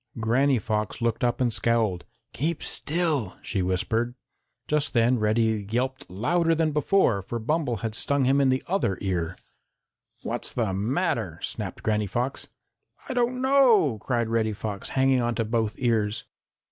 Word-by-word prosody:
Granny 130 +5 +3
Fox 105 0 -2
looked 115 0 -1
up 120 0 +1
and 120 -3 +1
scowled. 110 -7 0 0.3
"Keep 160 +4 -2
still," 155 - 0
she 100 - -2
whispered. 110 +7 -1 0.5
Just 150 -1 0
then 120 0 +3
Reddy 110 -1 +1
yelped 130 +4 -2
louder 165 - +1
than 160 -1 +1
before, 150 - +2
for 120 +5 -5
Bumble 140 +2 0
had 110 - -2
stung 140 +4 +1
him 135 +2 +3
in 135 - +4
the 130 0 +1
other 170 - 0
ear. 90 -3 -2 0.9
"What's - - -3
the 110 -6 -1
matter?" 110 - -1
snapped - - -4
Granny 105 -1 +1
Fox. 125 +7 -3 0.6
"I - - -1
don't 250 0 0
know," 240 - +4
cried 120 -1 0
Reddy 110 -1 +1
Fox, 100 -1 -5
hanging 130 -1 +2
on 120 0 0
to 115 - 0
both 110 -1 -1
ears. 110 -3 0
120 Hz, 155 wpm, -26 LUFS, 110-140 Hz, 0.9 s, in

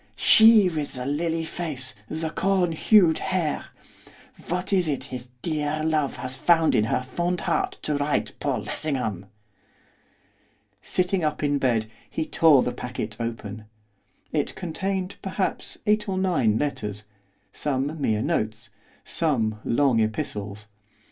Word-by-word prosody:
She 220 -3 +7
with 155 -4 -3
the 125 -1 -5
lily 165 +3 -1
face, 150 -8 -4 0.2
the 160 0 -3
corn 190 -2 +1
hued 170 0 +4
hair! 180 -5 -1 0.8
What 180 +3 -2
is 180 -3 +3
it 145 -3 -1
his 125 0 -6 0.2
dear 155 -1 -1
love 155 -3 +1
has 130 0 -6
found 165 +4 +3
in 105 - +3
her 120 - 0
fond 175 +7 -2
heart - - -1
to 150 -1 0
write 145 0 0
Paul - - -1
Lessingham?' 125 - -3 1.5
Sitting 180 -1 0
up 150 0 -1
in 145 -1 +1
bed 115 -5 +1 0.2
he 160 - -2
tore 155 -6 +5
the 125 - -1
packet 110 -4 -5
open. 110 -2 -5 0.7
It 150 -2 -1
contained, 190 +2 -3
perhaps, 190 0 -2
eight 210 0 +2
or 190 - -1
nine 160 - +2
letters, 105 -8 -3 0.5
some 145 +2 -2
mere 110 -5 +1
notes, 110 +1 -2 0.3
some 115 -10 0
long 130 -1 +2
epistles. 105 -1 -2
150 Hz, 135 wpm, -25 LUFS, 120-175 Hz, 1.5 s, She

